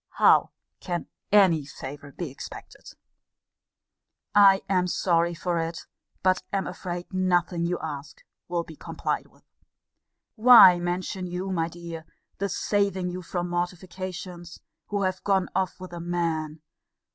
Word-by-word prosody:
How - - +5 0.3
can 175 -2 -3 0.3
any 185 -7 +5
favour 140 +1 -9
be 160 0 -6
expected? 135 - -10 1.4
I 200 -1 +6
am 185 -2 +2
sorry 170 -1 +1
for 170 0 -1
it; 165 0 -3 0.4
but 185 0 +3
am 195 -1 -1
afraid 175 0 -6
nothing 175 -2 +1
you 175 0 -1
ask 150 -1 -7 0.2
will 175 -1 -1
be 160 - -12
complied - - -3
with. - - -26 0.9
Why 220 -6 +9
mention 180 +1 -3
you, 180 +2 -4
my 165 -3 0
dear, 170 -1 -8 0.3
the 200 +1 -1
saving 195 -3 0
you 180 +1 -5
from 175 0 -3
mortifications, 175 0 -5 0.3
who 205 -1 -1
have 185 0 -1
gone 195 -2 +1
off 190 0 -1
with 185 -1 -9
a 175 - -6
man? 165 -3 -2
175 Hz, 135 wpm, -26 LUFS, 170-185 Hz, 1.4 s, Why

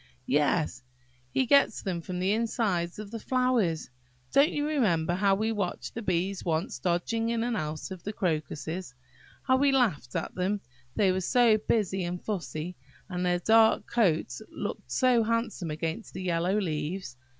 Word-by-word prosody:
"Yes, 145 0 +1 0.5
he 260 - +2
gets 280 -2 +4
them 180 -3 -2
from 180 +2 -5
the 185 +2 +1
insides 215 -6 0
of 210 -1 -7
the 230 - -5
flowers. 235 - +1 0.4
Don't 280 +2 +5
you 290 - -1
remember 185 - +1
how 195 +1 +3
we 220 +3 0
watched 200 -5 -3
the 230 - -5
bees 190 -1 -1
once 170 +8 -1
dodging 200 +6 0
in 230 -1 0
and 240 -1 -1
out 155 -1 -4
of 185 -2 -7
the 210 - -4
crocuses, 160 -3 -3 0.5
how 260 -1 +3
we 280 +1 +4
laughed 220 - +1
at - - -2
them, 195 +3 -1 0.3
they 195 -3 +3
were 185 +1 0
so 230 +2 +4
busy 195 -3 0
and 175 +1 -3
fussy, 180 -4 -4 0.3
and 180 -1 -2
their 180 0 +2
dark 220 +4 +4
coats 165 - +1
looked - - -6
so 255 -3 +4
handsome 225 -6 -1
against 160 +7 -4
the 185 - -4
yellow 180 +2 +1
leaves? 155 -3 -3
190 Hz, 165 wpm, -28 LUFS, 170-225 Hz, 0.5 s, Don't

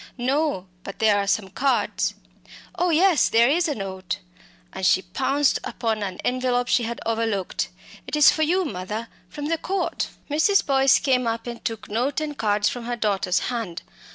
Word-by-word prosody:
"No; 270 -4 0 0.2
but 195 - -8
there 220 -2 +4
are 200 - -1
some 195 -1 0
cards. 270 +7 0 0.6
Oh 360 - 0
yes, 345 +1 +4
there 230 +1 +5
is 335 +6 +2
a 295 - -1
note," 190 -3 -4 0.6
and 190 - -6
she 190 0 +4
pounced 270 +9 +1
upon 225 -3 -2
an 190 -3 -4
envelope 250 -1 0
she - - +3
had 235 0 -4
overlooked. 225 -4 -1 0.4
"It - - -2
is 300 -1 +7
for 315 - -2
you, 355 +4 +2
mother 210 - -5 0.2
from 290 -1 -6
the 325 +1 0
Court." 385 +1 -2 0.2
Mrs. 315 +7 +3
Boyce 270 -1 +4
came 255 -3 +1
up 225 0 -2
and 235 -1 -7
took 225 -1 -4
note 245 +8 -1
and 305 -1 -4
cards 205 -3 +1
from 245 -2 -3
her 240 0 -2
daughter's 200 -5 0
hand. 220 -8 -4
240 Hz, 180 wpm, -24 LUFS, 205-290 Hz, 0.6 s, is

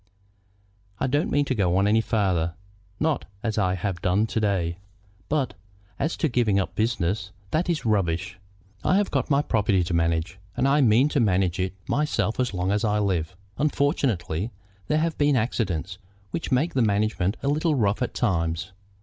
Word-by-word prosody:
"I - - +1
don't 145 +4 +1
mean 145 0 +2
to 135 - 0
go 95 -6 +1
on 100 - +3
any 110 +2 +4
farther, 90 -7 0 0.4
not 155 -2 0 0.2
as 110 -2 -1
I 95 -2 +2
have 90 -2 -3
done 95 +4 +2
to 110 - -2
day; 95 -5 0 0.5
but 140 -8 0 0.5
as 160 - -1
to 165 - +1
giving 120 -6 +2
up 95 - -2
business, 100 -3 -1 0.2
that 170 +3 0
is 165 -7 -1
rubbish. 95 -3 0 0.4
I 185 - +3
have 205 -1 +1
got - - 0
my 140 0 +3
property 105 -6 +2
to 85 +1 -3
manage, 85 +2 0 0.2
and 135 - +2
I 145 +2 +4
mean 125 +2 +5
to 145 - +1
manage 95 -5 +2
it 95 0 -1
myself 150 -6 0
as 125 -1 +1
long 90 0 -1
as 105 0 +1
I 105 -1 +2
live. 90 -5 -1 0.2
Unfortunately, 120 - 0 0.4
there 155 - +2
have 160 +1 -1
been 145 -1 +4
accidents 95 -6 -1 0.3
which 165 - -4
make 140 +7 +2
the 130 - +2
management 105 -2 +1
a - - -1
little 155 +2 +2
rough 105 -4 +1
at 125 - -2
times. 85 -4 0
105 Hz, 180 wpm, -25 LUFS, 90-135 Hz, 0.5 s, mean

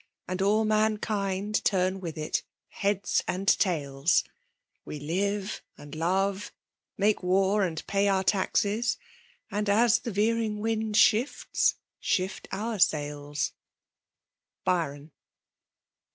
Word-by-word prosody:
And 185 +1 -3
all 210 +3 +3
mankind 215 -1 0
turn 185 -1 +1
with 170 -3 -6
it 155 0 -1 0.2
— - - -64
heads 200 -1 +1
and 190 +2 -3
tails; 150 -6 +2 0.6
We 150 - -7
live 195 +7 -2 0.2
and 145 0 -11
love 190 +5 0 0.2
— - - -64
make 205 +1 +2
war 195 +3 +2
and 170 -4 -2
pay 200 0 +1
oar 190 -1 +1
taxes; 205 +4 +1 0.5
And» 210 0 -1
as 230 +3 +4
the - - -5
veering 215 +1 +1
wind 220 -1 -1
shifts, 230 +5 +3
— - - -64
shift 185 0 -1
cnir 215 0 -3
sails. 145 -1 0 1.1
Byaon. 155 -4 -1
195 Hz, 120 wpm, -28 LUFS, 175-210 Hz, 1.1 s, as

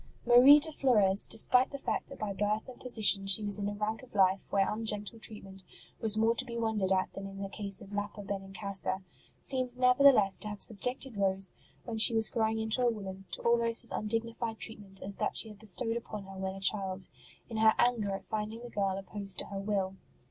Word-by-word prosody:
Marie 245 +4 +8
de 315 +2 +1
Flores, 210 -9 +3
despite 250 +3 +3
the 280 - -7
fact 275 - -4
that 275 - -10
by 205 -2 -4
birth 210 +2 -2
and 255 -1 -12
position 215 -5 +3
she 195 +2 +5
was 205 0 0
in 200 0 -2
a - - -5
rank 215 +2 -3
of 255 -4 -17
life 190 -1 +2
where 195 -1 +1
ungentle 215 0 -3
treatment 195 -3 -7 0.4
was 215 -1 0
more 225 +1 +2
to - - -3
be 235 -1 -7
wondered 220 -4 -1
at 190 -1 0
than 195 0 -7
in 195 0 -10
the - - -4
case 200 -1 -3
of 200 - -13
Lapa 205 0 -5
Benincasa, 195 -1 -3 0.4
seems 255 -2 -1
never 250 +2 +3
theless 210 -9 +5
to - - -4
have 210 -1 -7
subjected 250 +2 +1
Rose, 195 -1 +2 0.3
when 225 -2 -5
she 225 +1 +8
was 220 -1 +5
growing 220 -1 -1
into 220 +3 -1
a 245 - +3
woman, 195 -4 -7
to - - -7
almost 235 0 +2
as 235 - +6
undignified 230 +1 -3
treatment 200 -4 -7
as 200 +1 -6
that - - -1
she 225 - +2
had 210 -1 -14
bestowed 220 +2 0
upon 215 -3 -7
her 195 0 -12
when 190 0 -4
a - - -9
child, 190 -1 +1 0.4
in 225 - -7
her 220 0 +4
anger 240 -4 +1
at 195 - -9
finding 220 +2 -5
the 240 - -10
girl 195 -2 -1
opposed 195 0 -3
to - - -4
her 200 -1 -7
will. 195 -2 -3
210 Hz, 220 wpm, -30 LUFS, 195-230 Hz, 0.4 s, Marie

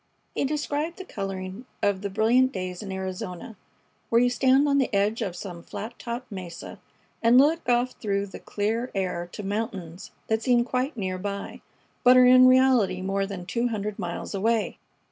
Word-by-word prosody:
He - - 0
described 300 +3 -2
the 380 - -8
coloring 195 - -5 0.2
of 200 -2 +1
the 200 - -3
brilliant 230 +6 +3
days 185 -4 -5
in 200 -2 -6
Arizona, 190 +1 -5 0.5
where 230 - +4
you 245 0 +3
stand 265 +3 +4
on 280 0 +3
the 265 - 0
edge 205 +3 +1
of 180 -3 -3
some 175 -2 -7
flat 225 +7 -8
topped 240 +1 -6
mesa 180 -4 -8 0.4
and 235 +2 +5
look 300 +2 +4
off 245 +1 +2
through 200 -2 -2
the 195 - -10
clear 225 +4 -2
air 180 -2 -2
to 210 - -7
mountains 195 -4 -4 0.2
that 220 0 0
seem 240 0 +3
quite 255 +2 -2
near 185 -3 -3
by, 200 +1 -5 0.4
but 250 0 +7
are 250 - +8
in 255 0 +8
reality 255 -8 +4
more 195 +1 -1
than 190 -3 -6
two 235 +5 0
hundred 210 -3 -4
miles 175 +3 -4
away. 220 +2 0
215 Hz, 180 wpm, -26 LUFS, 190-250 Hz, 0.5 s, are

